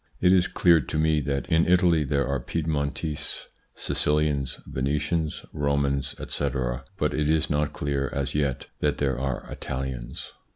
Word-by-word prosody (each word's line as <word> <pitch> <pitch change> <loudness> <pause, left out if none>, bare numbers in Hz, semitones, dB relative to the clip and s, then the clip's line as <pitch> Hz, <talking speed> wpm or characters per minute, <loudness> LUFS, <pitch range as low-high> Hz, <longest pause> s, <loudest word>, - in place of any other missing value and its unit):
It 90 0 +5
is 90 -1 +4
clear 85 -2 +5
to 75 - -4
me 80 -1 +3
that 70 -1 -1
in 80 0 +4
Italy 90 -3 +4
there 70 0 0
are 70 0 0
Piedmontese, 75 +2 -2 0.3
Sicilians, 75 -3 0
Venetians, 75 +4 -1
Romans, 70 -2 0
etc., 65 -2 -2
but - - +1
it 75 0 +1
is 80 0 +2
not 75 0 +1
clear 70 -2 -1
as 70 0 -2
yet 70 -4 0
that - - +1
there 65 -3 0
are 65 -1 -2
Italians. 65 -2 -5
70 Hz, 150 wpm, -26 LUFS, 70-75 Hz, 0.3 s, It